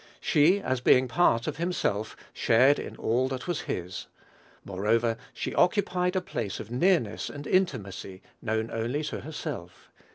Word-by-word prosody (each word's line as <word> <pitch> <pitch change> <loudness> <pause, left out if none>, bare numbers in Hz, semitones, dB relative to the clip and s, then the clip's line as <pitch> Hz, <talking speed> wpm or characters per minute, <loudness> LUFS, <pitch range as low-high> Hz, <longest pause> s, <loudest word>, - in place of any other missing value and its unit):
She, 160 +7 +4
as 130 -10 -1
being 130 +1 +5
part 120 -5 +3
of - - -3
himself, 160 - -1 0.2
shared 130 +5 +4
in - - -6
all 125 +3 +1
that 130 -1 -4
was 175 - -1
his. 90 +1 -4 0.6
Moreover, 115 +4 +1 0.2
she - - -4
occupied 180 -2 +2
a 185 - +2
place 110 - -4
of 110 - -8
nearness 125 - +1
and 145 0 -8
intimacy 100 - -1 0.2
known 110 0 -1
only 120 +7 -2
to 150 - -4
herself. 85 - -7
125 Hz, 150 wpm, -28 LUFS, 110-165 Hz, 0.6 s, being